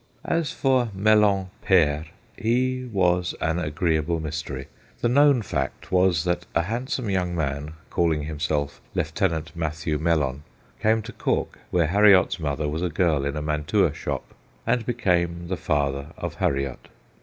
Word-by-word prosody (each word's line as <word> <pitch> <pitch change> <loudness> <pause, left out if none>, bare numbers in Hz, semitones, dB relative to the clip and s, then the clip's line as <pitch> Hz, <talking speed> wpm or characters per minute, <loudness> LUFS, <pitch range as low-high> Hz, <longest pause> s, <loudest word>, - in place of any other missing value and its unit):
As 165 -3 0
for 130 -3 +2
Mellon 100 -2 +3
pere, 80 -5 +3 0.3
he 125 +2 0
was 90 -3 +1
an 80 +2 0
agreeable 80 0 0
mystery. 75 -4 -4 0.4
The - - +2
known 140 -2 +5
fact 65 -7 -3
was 90 -3 +3
that 90 -1 -1
a 85 - +3
handsome 125 - -3
young 90 -2 0
man, 75 -1 -2 0.2
calling 80 -3 +1
himself 75 -3 -2
Lieutenant 80 0 -1
Mathew 80 -1 -2
Mellon, 75 -4 +1 0.4
came 110 0 +2
to - - -9
Cork, - - -1
where 85 -2 +2
Harriot's 100 +1 +5
mother 75 -1 -1
was 75 +3 -2
a 90 - 0
girl 80 -4 +1
in 70 +1 -2
a 75 - -3
mantua 75 0 +1
shop, - - -5 0.3
and 120 -2 0
became 85 -7 0
the 95 - 0
father 70 -4 -1
of - - -4
Harriot. 70 -2 -2
85 Hz, 145 wpm, -25 LUFS, 75-100 Hz, 0.4 s, known